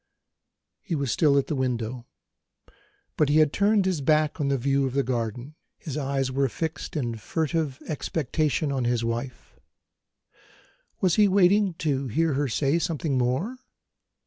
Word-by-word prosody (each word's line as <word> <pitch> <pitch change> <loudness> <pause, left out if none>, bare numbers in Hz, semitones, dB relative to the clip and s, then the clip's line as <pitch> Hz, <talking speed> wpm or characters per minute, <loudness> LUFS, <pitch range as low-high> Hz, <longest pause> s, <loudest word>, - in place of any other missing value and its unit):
He 180 -5 -3
was 140 -5 -1
still 145 +1 +3
at 140 - +2
the - - -3
window, 125 -2 -2 1.1
but 150 - +3
he 150 - +4
had 155 -2 +4
turned 200 0 +3
his 185 -6 0
back 155 +2 +2
on 140 - 0
the 140 0 +1
view 135 +2 +1
of 130 - -5
the 140 - +2
garden; 120 +2 -3 0.2
his 150 -5 -7
eyes 135 -2 -1
were 135 0 +1
fixed, 160 +5 -5
in 120 -6 -2
furtive 155 +2 -2
expectation, 155 0 -1
on 130 -3 -1
his 120 -1 0
wife. 120 +2 -5 1.4
Was 180 -3 +2
he 210 -1 +6
waiting 195 0 +3
to 140 -4 -1
hear 160 +6 +1
her 140 +1 0
say 140 +6 +1
something 160 -4 -1
more? 130 - -1
140 Hz, 155 wpm, -26 LUFS, 130-160 Hz, 1.4 s, he